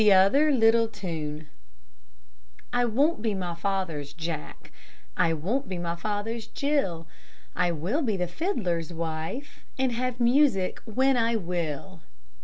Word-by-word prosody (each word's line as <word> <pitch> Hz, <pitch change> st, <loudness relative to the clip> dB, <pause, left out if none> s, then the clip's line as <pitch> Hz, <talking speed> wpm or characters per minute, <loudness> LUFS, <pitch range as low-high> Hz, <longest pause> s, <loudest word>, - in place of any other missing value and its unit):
T'OTHER 210 Hz, +10 st, +6 dB
LITTLE 230 Hz, -3 st, +5 dB
TUNE 160 Hz, -7 st, -5 dB, 1.3 s
I 245 Hz, 0 st, +3 dB
won't 270 Hz, +4 st, +2 dB
be 215 Hz, -2 st, 0 dB
my 180 Hz, -2 st, -3 dB
father's 170 Hz, -6 st, -2 dB
Jack, 160 Hz, -, -6 dB, 0.4 s
I 165 Hz, -, +3 dB
won't 195 Hz, -, -1 dB
be 185 Hz, -, -3 dB
my 170 Hz, -1 st, -2 dB
father's 215 Hz, +4 st, -3 dB
Jill; 230 Hz, -, -1 dB, 0.5 s
I 175 Hz, 0 st, +2 dB
will 175 Hz, -, -1 dB
be 220 Hz, -8 st, 0 dB
the 180 Hz, -, 0 dB
fiddler's 180 Hz, -, -1 dB
wife, 165 Hz, -, -5 dB
And 260 Hz, -1 st, +1 dB
have 250 Hz, +1 st, -2 dB
music 240 Hz, -6 st, +3 dB
when 260 Hz, +4 st, +2 dB
I 230 Hz, 0 st, +2 dB
will. 175 Hz, -2 st, -3 dB
195 Hz, 130 wpm, -27 LUFS, 170-245 Hz, 1.3 s, T'OTHER